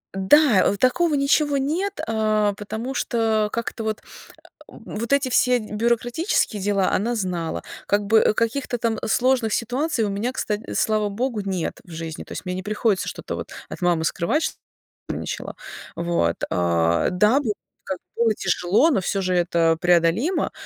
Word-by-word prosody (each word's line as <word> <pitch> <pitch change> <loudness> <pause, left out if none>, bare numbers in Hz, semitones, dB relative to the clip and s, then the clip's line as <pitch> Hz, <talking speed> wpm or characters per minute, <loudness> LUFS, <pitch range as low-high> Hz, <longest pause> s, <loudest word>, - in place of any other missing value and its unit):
Да, 215 +2 +5
о - - 0
такого 300 - +2
ничего 285 +1 +2
нет, 350 +9 -1
а, 215 -2 +1
потому 220 +5 -5
что, 225 -4 +1
а, - - -3
как-то 230 0 -4
вот, 215 -1 -2 0.7
вот 235 +5 -6
эти 280 -2 +2
все 250 0 +3
бюрократические 235 - 0
дела 200 -2 +1
она 235 +5 0
знала, 175 - -2 0.2
как 205 0 +1
бы 220 0 +4
каких-то 245 +2 -1
там 225 -1 -1
сложных 245 -1 +2
ситуаций 250 +3 0
у 205 - 0
меня, 220 +6 -2
кста 210 -4 -2 0.2
слава 215 -1 +1
Богу, 235 +2 -2
нет 190 -4 -3
в - - -19
жизни. 160 -1 -6
То - - -11
есть - - -6
мне 180 - -3
не 185 - -4
приходится 210 -1 0
что-то, - - -5
вот, - - -6 0.2
от - - -8
мамы 175 -2 +1
скрывать, 235 - 0
чтобы - - -3 0.5
она - - -3
нервничала, - - -5 0.4
вот. 170 - 0
А, 85 -1 +2
да, 210 +9 +3
было, 225 -7 -1 0.3
как 190 -2 -4 0.2
было 230 -2 +3
тяжело, 190 - +2
но 265 - +2
всё 195 +2 -1
же 185 0 0
это 170 -2 +2
преодолимо, 175 - +2
215 Hz, 165 wpm, -23 LUFS, 185-245 Hz, 0.7 s, Да